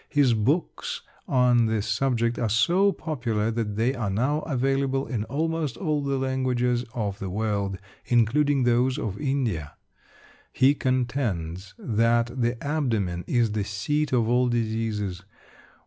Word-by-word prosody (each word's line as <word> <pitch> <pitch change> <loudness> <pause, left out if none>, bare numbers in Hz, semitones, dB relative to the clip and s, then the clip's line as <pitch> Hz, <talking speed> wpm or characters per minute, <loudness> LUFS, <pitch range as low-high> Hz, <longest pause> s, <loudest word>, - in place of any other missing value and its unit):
His 140 -5 +3
books 135 +11 -1 0.2
on 125 -3 +4
this 110 -2 0
subject 115 +1 0
are 115 - 0
so 175 - +3
popular 120 - -2
that 110 -3 -2
they 115 +5 +1
are 115 -6 -2
now 130 +10 +1
available 135 -1 0
in 110 -5 -3
almost 160 0 -2
all 155 -6 0
the 140 -1 -1
languages 130 -2 0
of 100 -4 -2
the 95 - -4
world, 100 -1 -1 0.3
including 130 +4 +3
those 125 +2 +2
of 100 +1 -4
India. 120 - -1 0.8
He 135 +2 +4
contends 120 - -2
that 115 +1 +1
the 120 +1 +1
abdomen 115 - -1
is 120 -3 +2
the 105 -1 -1
seat 140 +10 -1
of 120 -3 +2
all 125 +1 +3
diseases. 110 -5 -2
120 Hz, 135 wpm, -25 LUFS, 110-135 Hz, 0.8 s, on